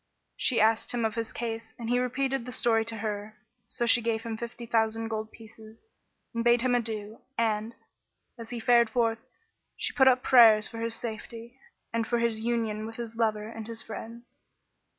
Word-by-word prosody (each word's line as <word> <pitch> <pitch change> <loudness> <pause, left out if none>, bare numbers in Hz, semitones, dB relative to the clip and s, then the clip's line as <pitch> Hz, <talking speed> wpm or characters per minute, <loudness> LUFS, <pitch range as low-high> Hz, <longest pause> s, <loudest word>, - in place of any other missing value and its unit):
She 250 - +2
asked 220 +2 +2
him 235 -2 0
of 220 - 0
his 230 -1 -3
case 225 -1 -5
and 235 - -6
he 245 +1 +2
repeated 265 +1 -1
the - - -5
story 225 -1 +2
to 225 0 -4
her; 210 0 -4 0.3
so 240 - -2
she 235 +1 +5
gave 225 -1 -1
him 230 -1 -4
fifty 235 +1 -7
thousand 225 -1 0
gold 220 -1 -4
pieces 220 0 -15 0.5
and 230 0 -1
bade 240 0 +4
him 255 -1 +2
adieu; 220 -2 -2 0.2
and, 225 0 0 0.6
as 230 -2 -9
he 240 - -5
fared 235 0 +4
forth, 230 -2 +1 0.6
she - - -1
put 265 -1 +5
up 255 -1 +4
prayers 225 -4 +7
for 230 - -8
his 230 0 -2
safety 230 +2 -7 0.3
and 230 0 0
for 240 - +1
his 235 -2 0
union 220 -2 -1
with 225 - -9
his 230 -1 -6
lover 215 -2 0
and 225 -1 -8
his 230 -1 -7
friends. 230 +2 -9
230 Hz, 190 wpm, -28 LUFS, 220-235 Hz, 0.6 s, prayers